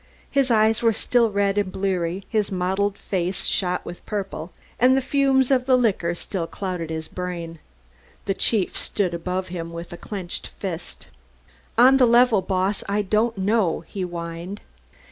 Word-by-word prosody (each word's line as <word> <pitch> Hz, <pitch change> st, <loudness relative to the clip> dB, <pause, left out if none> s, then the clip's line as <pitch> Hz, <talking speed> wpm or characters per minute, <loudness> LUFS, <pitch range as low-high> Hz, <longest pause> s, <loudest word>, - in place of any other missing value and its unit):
His 275 Hz, -2 st, +2 dB
eyes 220 Hz, -1 st, +3 dB
were 230 Hz, -1 st, +4 dB
still 235 Hz, +2 st, +2 dB
red 200 Hz, 0 st, +1 dB
and 195 Hz, -2 st, -1 dB
bleary, 185 Hz, -1 st, -1 dB
his 215 Hz, -3 st, 0 dB
motley 190 Hz, +2 st, 0 dB
face 185 Hz, 0 st, -2 dB
shot 180 Hz, -1 st, 0 dB
with 175 Hz, -, -8 dB
purple, 195 Hz, -5 st, -4 dB, 0.3 s
and 255 Hz, +2 st, +5 dB
the -, -, +5 dB
fumes 270 Hz, -1 st, +2 dB
of 255 Hz, -1 st, +2 dB
the 255 Hz, -1 st, +5 dB
liquor 190 Hz, -8 st, +1 dB
still 175 Hz, -1 st, -4 dB
clouded 180 Hz, -2 st, -4 dB
his 160 Hz, 0 st, -4 dB
brain. 170 Hz, -3 st, -5 dB, 0.7 s
The 195 Hz, -, +1 dB
chief 195 Hz, -1 st, +1 dB
stood 190 Hz, -4 st, -1 dB
above 180 Hz, +2 st, -3 dB
him 170 Hz, -2 st, -5 dB
with 170 Hz, +1 st, -7 dB
clenched 190 Hz, -4 st, -5 dB
fist. 175 Hz, -3 st, -6 dB, 0.7 s
"On 260 Hz, +3 st, +7 dB
the 255 Hz, -2 st, +5 dB
level, 235 Hz, -3 st, +5 dB
Boss, 190 Hz, +2 st, 0 dB
I 205 Hz, +1 st, +1 dB
don't 215 Hz, +3 st, +1 dB
know," 195 Hz, -3 st, +1 dB
he 190 Hz, +3 st, -7 dB
whined. 170 Hz, +2 st, -5 dB
195 Hz, 160 wpm, -23 LUFS, 175-220 Hz, 0.7 s, On